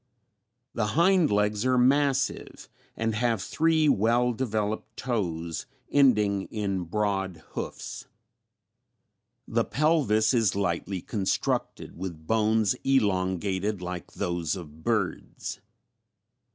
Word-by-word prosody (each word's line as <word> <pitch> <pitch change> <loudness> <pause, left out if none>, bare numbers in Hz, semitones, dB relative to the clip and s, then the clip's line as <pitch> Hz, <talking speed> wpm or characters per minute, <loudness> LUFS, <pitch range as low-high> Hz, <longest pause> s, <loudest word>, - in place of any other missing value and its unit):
"The 105 -2 0
hind 180 -1 +5
legs 105 +1 +1
are 130 0 +2
massive 135 +2 +1 0.3
and 115 0 0
have 115 0 +1
three 160 - +2
well 120 +1 +3
developed 110 -3 -3
toes 85 -9 -3 0.2
ending 105 -8 +3
in 100 -4 -2
broad 95 -3 -2
hoofs. - - -6 1.4
The - - +1
pelvis 135 -8 +2
is 115 -6 +2
lightly 90 -1 -2
constructed 100 -4 -2
with 85 -3 -7
bones 110 0 +2
elongated 100 -4 +1
like 90 -1 -6
those 85 -5 -2
of 80 -3 -10
birds. 105 -6 -2
105 Hz, 100 wpm, -27 LUFS, 95-125 Hz, 1.4 s, hind